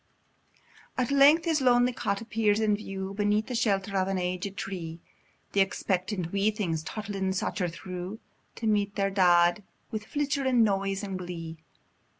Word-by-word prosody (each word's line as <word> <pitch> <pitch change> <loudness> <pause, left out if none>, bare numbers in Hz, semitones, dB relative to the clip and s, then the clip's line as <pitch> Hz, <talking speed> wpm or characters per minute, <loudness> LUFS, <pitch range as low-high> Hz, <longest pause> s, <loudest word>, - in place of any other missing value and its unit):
At 255 0 0
length 285 +4 +6
his 320 -4 +1
lonely 245 -1 +4
cot 200 -3 -2
appears 220 -2 +1
in 215 -2 +2
view, 195 -2 -5
Beneath 210 +1 +1
the 255 - -5
shelter 200 -4 0
of 190 -1 +2
an 195 0 -1
aged 185 +2 -3
tree; 170 -4 -5 0.5
Th' - - -4
expectant 190 -2 0
wee 200 +1 +2
things, 180 -7 -2
toddlin, 195 +2 -3
stacher 180 -1 -1
through 180 +4 -6 0.4
To 230 - -6
meet 205 -2 +1
their 195 0 0
dead, 175 -1 +4 0.3
wi' 220 - -2
flichterin 265 0 +1
noise 195 -1 0
and 195 -2 -4
glee. 165 -2 -6
200 Hz, 150 wpm, -28 LUFS, 185-220 Hz, 0.5 s, length